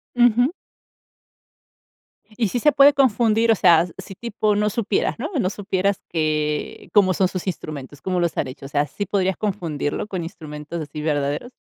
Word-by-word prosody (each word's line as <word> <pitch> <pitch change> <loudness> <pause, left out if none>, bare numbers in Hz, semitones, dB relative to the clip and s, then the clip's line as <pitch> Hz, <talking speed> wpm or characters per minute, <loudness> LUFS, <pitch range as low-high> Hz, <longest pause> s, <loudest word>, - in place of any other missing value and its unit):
Ujú. 245 +2 +4 1.9
Y 225 -4 +1
sí 245 - -1
se 300 +2 +4
puede 280 +1 +7
confundir, 230 -4 +3
o 225 - +6
sea, 170 -3 +5
si 195 +1 -9
tipo 215 -1 -1
no 210 0 +1
supieras, 235 - -1
¿no?, - - -4
no 185 -4 0
supieras 200 -1 -1
que 150 -2 -2
cómo 190 -3 +4
son 185 +1 +2
sus 185 0 -5
instrumentos, 145 -6 -6
cómo 185 -1 -1
los 170 -2 0
han - - 0
hecho, 135 +1 -9
o - - -9
sea, 145 0 0
¿sí 200 +9 -5
podrías 190 -2 0
confundirlo 170 -7 -2
con 190 -4 -4
instrumentos 155 0 -7
así 150 0 -6
verdaderos? 145 - -1
185 Hz, 170 wpm, -22 LUFS, 155-215 Hz, 1.9 s, puede